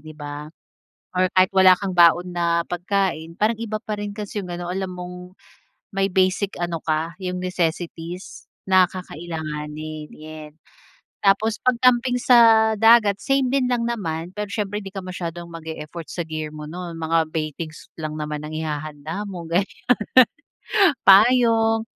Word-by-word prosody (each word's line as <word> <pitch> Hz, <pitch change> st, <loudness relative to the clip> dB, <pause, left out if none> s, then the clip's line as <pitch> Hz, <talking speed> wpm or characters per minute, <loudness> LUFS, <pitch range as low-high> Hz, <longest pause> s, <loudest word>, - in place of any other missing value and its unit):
di 155 Hz, -, -9 dB
ba? 145 Hz, 0 st, -7 dB, 0.7 s
Or 185 Hz, 0 st, +3 dB
kahit 185 Hz, 0 st, +5 dB
wala 190 Hz, -1 st, +7 dB
kang 190 Hz, -2 st, -3 dB
baon 175 Hz, +1 st, +5 dB
na 170 Hz, 0 st, +2 dB
pagkain, 175 Hz, -2 st, -1 dB
parang 220 Hz, +1 st, +2 dB
iba 215 Hz, -2 st, -3 dB
pa 215 Hz, -3 st, -4 dB
rin 205 Hz, 0 st, -4 dB
kasi 210 Hz, -1 st, -4 dB
yung 180 Hz, -, -8 dB
ano, 175 Hz, 0 st, -5 dB
alam 190 Hz, +1 st, -3 dB
mong 180 Hz, 0 st, -9 dB, 0.6 s
may 195 Hz, 0 st, +2 dB
basic 185 Hz, +2 st, +1 dB
ano 170 Hz, -1 st, -2 dB
ka, 160 Hz, +1 st, -1 dB
yung 180 Hz, 0 st, -3 dB
necessities 175 Hz, 0 st, -4 dB, 0.2 s
na 185 Hz, -1 st, +6 dB
kakailanganin, 155 Hz, -3 st, -6 dB
yen. 155 Hz, -1 st, -10 dB, 0.7 s
Tapos 210 Hz, +3 st, +3 dB
'pag 255 Hz, -1 st, +3 dB
camping 250 Hz, 0 st, +4 dB
sa 225 Hz, -3 st, +6 dB
dagat, 225 Hz, -3 st, +5 dB
same 270 Hz, -1 st, +1 dB
din 270 Hz, -2 st, +2 dB
lang 240 Hz, -1 st, 0 dB
naman. 170 Hz, -7 st, -4 dB
Pero 210 Hz, 0 st, -3 dB
siyempre 210 Hz, -1 st, -2 dB
di -, -, -6 dB
ka 195 Hz, -, -5 dB
masyadong 175 Hz, -2 st, -6 dB
mag-e-effort 160 Hz, 0 st, -8 dB
sa 175 Hz, -, -3 dB
gear 155 Hz, -1 st, -5 dB
mo 150 Hz, 0 st, -7 dB
nun 170 Hz, 0 st, -7 dB
mga 160 Hz, 0 st, +1 dB
baitings 155 Hz, 0 st, -5 dB
lang 155 Hz, -1 st, -4 dB
naman 150 Hz, 0 st, -4 dB
ang 155 Hz, +1 st, -6 dB
ihahanda 155 Hz, +4 st, -4 dB
mo, 180 Hz, -3 st, -7 dB
ganiyan. 180 Hz, +4 st, -1 dB, 1.3 s
Payong, 225 Hz, +1 st, +5 dB
180 Hz, 150 wpm, -22 LUFS, 160-205 Hz, 1.3 s, wala